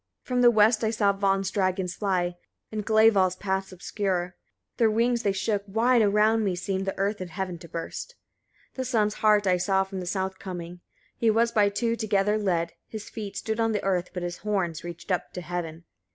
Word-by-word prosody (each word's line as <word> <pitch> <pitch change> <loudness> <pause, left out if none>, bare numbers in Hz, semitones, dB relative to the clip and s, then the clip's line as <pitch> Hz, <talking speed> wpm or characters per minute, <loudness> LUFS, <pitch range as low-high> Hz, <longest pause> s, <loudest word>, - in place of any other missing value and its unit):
54. 250 - -4
From 245 - +3
the 240 - +8
west 220 0 +4
I 220 - +2
saw 210 -3 +2
Von's 195 -1 0
dragons 185 -2 0
fly, 180 -4 -1 0.4
and 215 -1 -3
Glæval's 215 -4 +4
paths 190 0 -2
obscure: 185 -1 -2 0.4
their 230 -3 +4
wings 235 +2 +1
they 200 - +1
shook; 200 +1 -1
wide 230 +4 +3
around 215 +2 +3
me 190 -3 0
seemed 190 +1 -2
the 195 - -3
earth 200 +1 -1
and 185 - -5
heaven 185 -1 -4
to 170 - -11
burst. 170 - -6 0.6
55. - - -32
The 260 - -2
sun's 215 -4 +1
hart 210 -1 +3
I 185 -1 +3
saw 190 +1 +2
from 190 0 -6
the 180 - -6
south 190 0 -2
coming, 175 -2 -7 0.4
he 230 - +2
was 230 +2 +3
by 210 -3 +4
two 230 +3 0
together 210 -1 +1
led: 170 -5 0
his 215 -2 -8
feet 205 -3 -6
stood 220 0 -3
on 225 -1 +2
the 210 - -1
earth, 180 -2 0
but 180 - -5
his 175 0 -4
horns 190 -6 -2
reached 175 +2 -7
up 180 - -1
to 180 - -5
heaven. 170 -2 -5
195 Hz, 210 wpm, -26 LUFS, 185-215 Hz, 0.6 s, the